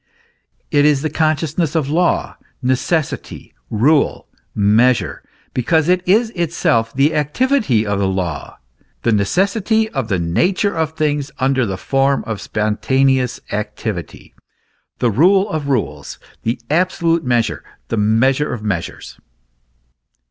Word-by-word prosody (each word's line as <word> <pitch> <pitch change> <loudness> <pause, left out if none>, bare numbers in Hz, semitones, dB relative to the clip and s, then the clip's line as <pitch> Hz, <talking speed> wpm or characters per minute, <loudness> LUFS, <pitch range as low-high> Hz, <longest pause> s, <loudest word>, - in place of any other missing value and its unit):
It 145 -3 +4
is 145 -1 +3
the 155 - -1
consciousness 155 +1 0
of 155 -4 +1
law, 170 +5 0 0.3
necessity, 135 +5 -2 0.2
rule, 140 +8 +2 0.3
measure, 110 +5 +2 0.3
because 160 +5 +1
it 180 0 +3
is 220 +4 +3
itself 155 - 0
the 140 +5 +2
activity 150 - +1
of 100 -1 -1
law, 95 -6 -3 0.5
the 115 - +2
necessity 195 - +1
of 135 - -3
the 100 -4 0
nature 175 - 0
of 160 -1 -1
things 150 -2 -1
under 130 -2 +1
the 95 -1 -3
form 135 +5 +1
of 110 -3 -4
spon 105 0 -1
taneous 130 -2 +1
activity, 105 -3 -5 0.6
the 120 - +1
rule 190 - +4
of 155 -3 -3
rules, 75 - -2 0.2
the 115 +2 -2
absolute 170 -1 +1
measure, 120 -2 0 0.3
the 115 - -1
measure 120 +7 +2
of 120 -4 -5
measures. 95 -6 -4
135 Hz, 125 wpm, -18 LUFS, 110-160 Hz, 0.6 s, It